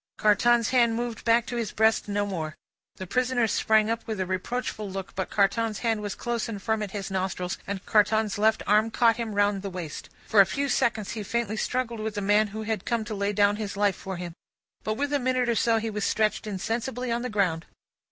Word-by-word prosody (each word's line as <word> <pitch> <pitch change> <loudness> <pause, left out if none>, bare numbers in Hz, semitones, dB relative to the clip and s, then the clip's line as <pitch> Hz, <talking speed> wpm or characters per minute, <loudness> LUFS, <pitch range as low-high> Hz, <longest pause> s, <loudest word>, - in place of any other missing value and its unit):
Carton's 230 +2 +3
hand 235 -3 +3
moved 235 -1 -4
back 230 0 +3
to 245 -2 -4
his 230 -4 -2
breast 220 0 +2
no 205 0 0
more. 160 -6 -4 0.4
The 185 - -7
prisoner 250 +3 +1
sprang 220 0 +3
up 230 0 -3
with 220 -3 -3
a 185 - 0
reproachful 210 +3 -3
look, 190 0 -6
but 190 - -3
Carton's 215 +2 +1
hand 225 -2 +1
was 205 -1 -4
close 235 -2 -2
and 210 -3 -5
firm 220 +2 -1
at 210 - -3
his 195 0 -5
nostrils, 185 -1 -2
and 200 -1 -4
Carton's 210 0 +2
left 220 +1 +3
arm 210 +2 +3
caught 230 0 +3
him 225 -3 -4
round 205 -1 +2
the 200 - -4
waist. 180 -5 -7 0.2
For 210 - +6
a - - +6
few 280 +5 -1
seconds 225 -5 0
he 220 - -4
faintly 220 +1 -2
struggled 235 0 -2
with 215 0 -3
the 205 - -2
man 205 +2 +3
who 220 +2 -6
had 215 -3 -2
come 230 -2 -1
to 220 - -5
lay 200 0 -1
down 205 0 +3
his 205 -2 -5
life 205 -2 +2
for 190 -1 -6
him; 175 -1 -6 0.5
but, 215 - -1
within 285 +2 0
a - - -7
minute 255 -1 +1
or 235 - +2
so, 230 0 +2
he 225 0 -2
was 210 -1 -3
stretched 215 0 0
insensible 230 +5 -3
on 235 +1 0
the 250 - -3
ground. 180 -6 0
215 Hz, 230 wpm, -26 LUFS, 200-230 Hz, 0.5 s, For